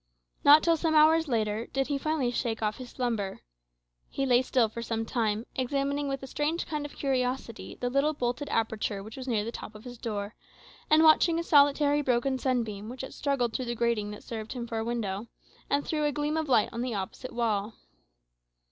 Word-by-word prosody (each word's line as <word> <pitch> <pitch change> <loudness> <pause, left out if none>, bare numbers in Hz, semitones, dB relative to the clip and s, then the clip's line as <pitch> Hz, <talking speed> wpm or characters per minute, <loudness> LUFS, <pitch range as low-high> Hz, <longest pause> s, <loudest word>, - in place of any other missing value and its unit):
Not 295 +2 +8
till 335 -1 +3
some 320 0 0
hours 320 +1 +5
later 220 -2 -1
did 270 0 -1
he 280 0 -2
finally 300 -5 0
shake 230 -2 -2
off 210 0 0
his 255 -1 -8
slumber. 225 -6 -2 0.7
He 275 - -2
lay 250 -1 +4
still 250 -2 +2
for 225 +2 -7
some 225 0 -2
time, 225 -2 -1
examining 280 +2 -1
with 275 -1 -3
a - - -3
strange 295 +5 -1
kind 300 -2 -3
of - - -16
curiosity 255 -3 -2
the 245 - -3
little 280 +3 +2
bolted 250 +1 -2
aperture 220 -3 -1
which 215 +1 -10
was 265 0 -7
near 215 -4 0
the 230 - -4
top 215 - -8
of 215 - -11
his 245 -2 -9
door, 210 -3 -4 0.6
and 310 +1 +6
watching 325 +1 +5
a 335 - -1
solitary 290 -1 +4
broken 260 0 +1
sunbeam 225 -6 -1
which 255 +2 -7
had 265 - -7
struggled 260 -5 0
through 255 - -2
the 240 0 -3
grating 235 -3 0
that 210 - -9
served 220 -1 -6
him 245 -2 -4
for 230 -1 -3
a - - -1
window, 225 -3 -3 0.4
and 285 0 +1
threw 305 -2 -1
a 295 - +2
gleam 295 +1 -1
of 315 -2 -1
light 225 -5 +4
on 230 - -4
the 245 -3 -2
opposite 195 +6 -5
wall. 220 -2 -1
250 Hz, 210 wpm, -28 LUFS, 225-285 Hz, 0.7 s, Not